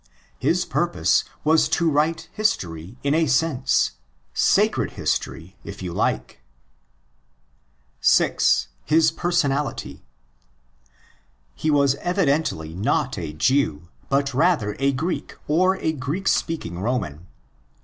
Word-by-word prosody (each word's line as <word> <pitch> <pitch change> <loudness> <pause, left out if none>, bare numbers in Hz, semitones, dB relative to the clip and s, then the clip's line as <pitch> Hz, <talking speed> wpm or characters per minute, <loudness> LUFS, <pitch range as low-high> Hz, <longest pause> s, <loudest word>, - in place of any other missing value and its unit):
His - - +1
purpose - - +1 0.2
was 160 +1 +3
to 170 - +1
write 155 +2 +1
history 95 - -2
in 140 0 +1
a 160 0 +2
sense—"' 130 -1 +2 0.4
sacred - - +2
history," 85 +4 -3
if 100 -1 -8
you 90 -2 -4
like. 65 - -2 1.6
6.—His 155 - +3
PEeRsonatiry. 150 -5 -1 1.5
He 155 - -2
was 140 -2 +4
evidently 155 - 0
not 100 +5 -1
a 80 -3 -5
Jew, 85 - 0 0.2
but 140 0 +1
rather 125 - +2
a 140 0 +2
Greek 160 +7 -3
or 185 +5 +3
8 160 -5 -2
Greek 155 +10 -3
speaking 90 - -1
Roman. 95 - -3
140 Hz, 105 wpm, -23 LUFS, 95-160 Hz, 1.6 s, was